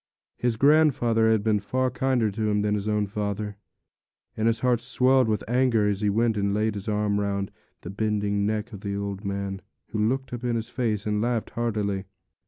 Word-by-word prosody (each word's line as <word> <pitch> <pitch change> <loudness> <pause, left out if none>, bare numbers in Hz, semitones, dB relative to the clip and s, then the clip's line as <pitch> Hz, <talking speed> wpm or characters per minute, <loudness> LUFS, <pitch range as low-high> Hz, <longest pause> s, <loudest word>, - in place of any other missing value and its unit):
His 120 -2 0
grandfather 130 -6 +4
had 110 -2 +2
been 110 -1 +2
far 130 +5 -1
kinder 125 -3 +1
to 110 +1 -1
him 105 0 +1
than 105 0 +1
his 105 0 -2
own 105 -1 +1
father; 105 0 -3 0.8
and 110 +1 0
his 115 0 +1
heart 125 -2 +2
swelled 130 0 +3
with 105 -2 -1
anger 120 -3 +2
as 100 0 -1
he 105 - +2
went 110 +1 +1
and 100 0 0
laid 110 0 +1
his 100 +1 -7
arm 105 -1 +1
round 100 -1 -2 0.3
the 90 - -7
bending 105 -1 0
neck 110 +2 -2
of 100 - -8
the 100 -2 -3
old 100 0 -4
man, 100 0 -3 0.3
who 110 - -3
looked 130 +5 0
up 120 0 -5
in 120 -1 0
his 115 -1 -3
face 110 -5 -1
and 105 0 0
laughed 120 -1 -1
heartily. 105 -4 -1
105 Hz, 200 wpm, -26 LUFS, 100-120 Hz, 0.8 s, grandfather